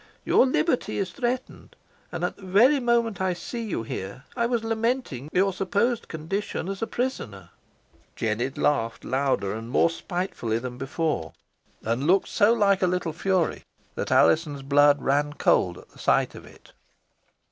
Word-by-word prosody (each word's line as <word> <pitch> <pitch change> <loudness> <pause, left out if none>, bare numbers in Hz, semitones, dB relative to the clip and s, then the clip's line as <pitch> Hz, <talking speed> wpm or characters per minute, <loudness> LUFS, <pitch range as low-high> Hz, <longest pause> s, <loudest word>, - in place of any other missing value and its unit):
Your 265 - +5
liberty 260 +1 0
is 195 -2 -2
threatened, 250 0 -4 0.4
and - - -4
at - - -1
the - - -19
very 220 +10 +4
moment 235 -5 +1
I 185 -1 +1
see 230 +7 -6
you 210 - -3
here 100 +3 -6
I 235 -1 +1
was 235 -2 -1
lamenting 225 - -2
your 195 +1 +2
supposed 200 +5 0
condition 165 +3 -4
as 195 0 -5
a 225 - -1
prisoner." 105 - -4 0.7
Jennet 120 +4 -2
laughed 115 -6 0
louder 130 -6 0
and 115 +1 -6
more 165 +6 +3
spitefully 175 - -3
than 125 +1 -6
before, 135 - -2 0.5
and 115 +6 -1
looked 190 +3 +3
so 210 +1 +4
like 200 -4 +3
a 185 - +3
little 175 -3 -1
fury 185 -2 0 0.3
that - - -4
Alizon's 150 -4 +3
blood 145 +1 +5
ran 145 +2 +1
cold 90 -10 +2
at - - -15
the - - -19
sight - - +2
of - - -11
it. - - -18
175 Hz, 160 wpm, -25 LUFS, 135-220 Hz, 0.7 s, Your